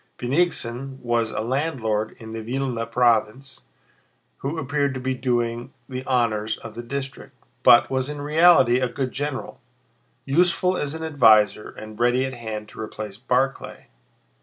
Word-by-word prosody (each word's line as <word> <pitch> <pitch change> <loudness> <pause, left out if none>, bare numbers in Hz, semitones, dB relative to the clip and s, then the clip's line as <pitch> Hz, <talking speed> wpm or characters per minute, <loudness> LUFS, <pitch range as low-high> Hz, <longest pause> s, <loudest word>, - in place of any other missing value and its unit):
Bennigsen 135 -2 -1
was 120 -2 0
a - - -3
landlord 115 -4 -1
in 110 -1 -10
the 115 - -5
Vílna 120 -1 -3
province 120 +2 +1 0.7
who 145 +4 -4
appeared 140 -1 -1
to - - -3
be 130 +1 -1
doing 120 -2 -1 0.2
the 130 -1 -5
honors 110 -4 0
of 115 - -10
the 120 - -6
district, 135 +2 -6 0.3
but 120 - +6
was 130 +1 -1
in 150 0 -5
reality 150 -4 +5
a 130 -1 0
good 130 +1 -3
general, 140 -1 -5 0.6
useful 180 +5 +2
as 145 -3 -3
an 160 - -6
adviser 110 -9 +4
and 110 0 -11
ready 120 +2 +2
at 130 - -5
hand 110 -3 -6
to - - -14
replace 105 -2 -7
Barclay. 130 +2 -2
125 Hz, 150 wpm, -23 LUFS, 115-140 Hz, 0.7 s, but